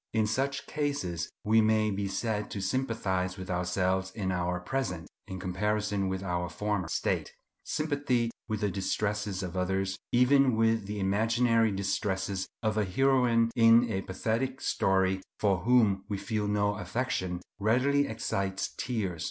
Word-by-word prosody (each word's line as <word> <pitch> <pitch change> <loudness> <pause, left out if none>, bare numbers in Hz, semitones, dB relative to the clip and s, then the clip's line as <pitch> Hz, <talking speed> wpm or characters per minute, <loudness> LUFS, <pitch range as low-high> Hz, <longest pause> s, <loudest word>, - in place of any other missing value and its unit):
In 110 -1 +2
such 135 +6 -1
cases 140 - -2
we 110 +1 +4
may 110 0 +3
be 100 0 -2
said 105 +1 -2
to 100 - -5
sympathize 95 -4 -1
with 95 +1 -6
ourselves 90 +1 0
in 95 -1 -3
our 90 0 -1
present, 90 - -3 0.2
in 95 - -6
comparison 100 +2 -1
with 95 0 -3
our 90 -2 -2
former, 105 -4 -2
state. - - -1 0.3
Sympathy 140 -6 0 0.2
with 110 -2 -2
the 105 -1 +1
distresses 100 0 -2
of 90 0 -5
others, 95 +1 -1
even 130 +1 +4
with 115 -2 +2
the 105 0 -4
imaginary 115 +3 +2
distresses 95 -1 -1 0.2
of 110 -1 +1
a - - +3
heroine 120 +2 +3
in 115 0 +6
a 95 -2 -1
pathetic 115 +8 -2
story, 95 0 +1 0.2
for 100 -3 +2
whom 105 -2 +3
we 100 - -1
feel 105 +1 -2
no 105 0 +1
affection, 95 -3 -2 0.2
readily 130 +7 +2
excites 100 -3 -2
tears. 105 -9 -2
105 Hz, 145 wpm, -29 LUFS, 95-115 Hz, 0.3 s, in